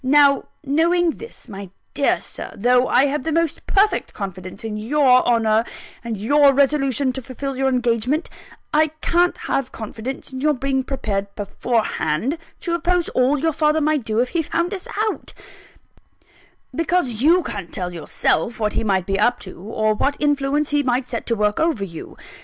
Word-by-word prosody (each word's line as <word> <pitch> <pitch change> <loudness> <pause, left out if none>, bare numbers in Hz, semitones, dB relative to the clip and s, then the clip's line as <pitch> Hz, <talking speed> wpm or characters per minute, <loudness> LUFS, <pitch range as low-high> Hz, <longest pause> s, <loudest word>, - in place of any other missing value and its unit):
Now, 280 +1 +4 0.2
knowing 330 +4 +2
this, 455 +8 -11
my 200 -3 -8 0.2
dear 280 0 +2
Sir - - -6
though 250 +4 +3
I 260 +3 +4
have 285 +1 -1
the 320 - -2
most 330 -1 -1
perfect 400 0 +1
confidence 190 -1 -7
in 220 -1 -4
your 255 +3 +3
honour, 225 -2 +3 0.4
and 230 -2 -4
your 280 +7 +4
resolution 275 -1 +2
to 265 - -5
fulfil 270 +1 -5
your 265 +1 +1
engagement 250 +4 0 0.5
I 310 +1 +4
can't 350 +1 +2
have 265 -2 -1
confidence 230 +5 -7
in 260 - -5
your 300 0 +2
being 265 0 -1
prepared 205 -7 -2
beforehand 220 - -1 0.2
to 340 - -2
oppose 345 0 +1
all 260 +3 +2
your 320 +3 0
father 305 +1 +2
might 305 -3 +1
do 220 -1 -2
if 250 +1 +1
he 335 - 0
found 340 +4 -1
us 380 -2 -6 0.2
out; - - -11 1.4
because 325 -9 0
you 340 +5 +5
can't 195 - -6
tell 180 -1 -4
yourself 170 +6 -1
what 210 -1 0
he - - -1
might 190 -4 +1
be 195 0 -1
up 245 +4 +2
to, 185 - -10
or 215 +1 0
what 280 +7 0
influence 290 0 +1
he 290 0 +3
might 250 -1 0
set 235 -2 -5
to 230 - +1
work 210 -1 0
over 320 -11 +1
you. 165 -5 -8
265 Hz, 175 wpm, -21 LUFS, 220-300 Hz, 1.4 s, you